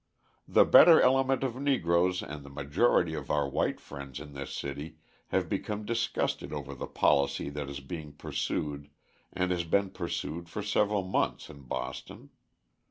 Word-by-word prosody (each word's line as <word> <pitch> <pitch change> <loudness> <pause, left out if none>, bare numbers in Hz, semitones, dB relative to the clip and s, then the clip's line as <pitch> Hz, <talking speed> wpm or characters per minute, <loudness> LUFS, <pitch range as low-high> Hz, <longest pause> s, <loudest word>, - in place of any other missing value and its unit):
The - - +5
better 165 -2 +9
element 135 0 +3
of 130 -2 -2
Negroes 90 -9 +2
and 75 -1 -7
the 70 - -11
majority 75 +5 +1
of - - -6
our 75 -2 +1
white 70 - -1
friends 70 -1 -8
in 70 0 -10
this 70 -1 -6
city 70 +3 -6 0.3
have - - 0
become 105 0 -3
disgusted 115 +1 -1
over 70 -2 -5
the 70 - -6
policy 70 0 +1
that 70 -1 -5
is 70 0 -6
being 75 +1 -7
pursued 75 0 -3 0.4
and 90 0 -1
has 90 -1 0
been 95 +3 +1
pursued 85 -1 -4
for 105 +4 -4
several 105 -1 +1
months 95 - -1
in 70 -1 -13
Boston. - - -6
80 Hz, 160 wpm, -29 LUFS, 70-100 Hz, 0.4 s, better